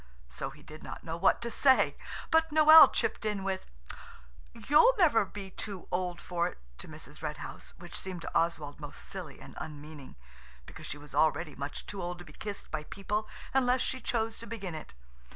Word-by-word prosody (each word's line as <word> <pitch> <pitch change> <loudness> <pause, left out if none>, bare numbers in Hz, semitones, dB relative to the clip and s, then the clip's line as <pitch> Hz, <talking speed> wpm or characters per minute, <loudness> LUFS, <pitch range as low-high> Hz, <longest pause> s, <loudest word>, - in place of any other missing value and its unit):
So 100 - -5
he 150 +2 -15
did 155 0 -11
not - - -8
know 165 -1 -4
what 190 +6 +3
to 235 - -3
say. 265 +1 +4 0.4
But 320 0 +4
Noël 310 +1 +9
chipped - - -1
in 210 -3 -1
with– 190 -1 -2 0.8
"You'll 465 - +5
never 300 - +5
be 195 0 -8
too 195 -2 -6
old 180 -1 -1
for 170 -1 -1
it," - - -8 0.2
to - - -8
Mrs. 150 -1 -11
Red 150 -1 -3
House–which 175 0 -8
seemed 185 -3 -6
to - - -5
Oswald 160 -4 0
most 145 -2 -8
silly 175 -8 -7
and - - -12
unmeaning, 150 -2 -9 0.5
because - - -10
she 145 - -5
was 145 0 -12
already 160 0 +2
much 140 +1 -5
too 200 -2 -5
old 175 0 -4
to 175 - -11
be 150 - -14
kissed 205 +3 -7
by 155 - -2
people 210 +4 -3 0.3
unless 255 -1 +3
she 260 0 -1
chose 225 -1 -1
to 230 - -9
begin 200 -5 -5
it. 155 - -8
180 Hz, 190 wpm, -31 LUFS, 155-225 Hz, 0.8 s, Noël